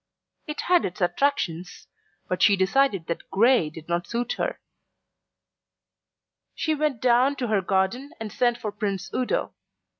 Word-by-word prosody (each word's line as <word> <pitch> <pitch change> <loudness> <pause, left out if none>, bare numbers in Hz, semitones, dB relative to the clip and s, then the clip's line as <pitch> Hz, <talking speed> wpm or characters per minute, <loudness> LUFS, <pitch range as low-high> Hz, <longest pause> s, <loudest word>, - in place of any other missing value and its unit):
It 300 - -4
had 355 -1 +3
its 180 - -4
attractions, 180 - -1 0.4
but 185 - -2
she 205 - +6
decided 195 0 +2
that 170 - -5
grey 230 -5 +4
did 160 0 -12
not 175 0 -1
suit 240 +1 -2
her. - - -2 2.0
She 315 - 0
went 295 -5 -1
down 255 +3 +4
to 250 -4 -3
her 210 -3 +2
garden 190 +9 0
and 220 -2 -5
sent 240 +1 +1
for 215 - -4
Prince 200 -2 -3
Udo. 255 - -1
220 Hz, 145 wpm, -25 LUFS, 185-265 Hz, 2.0 s, she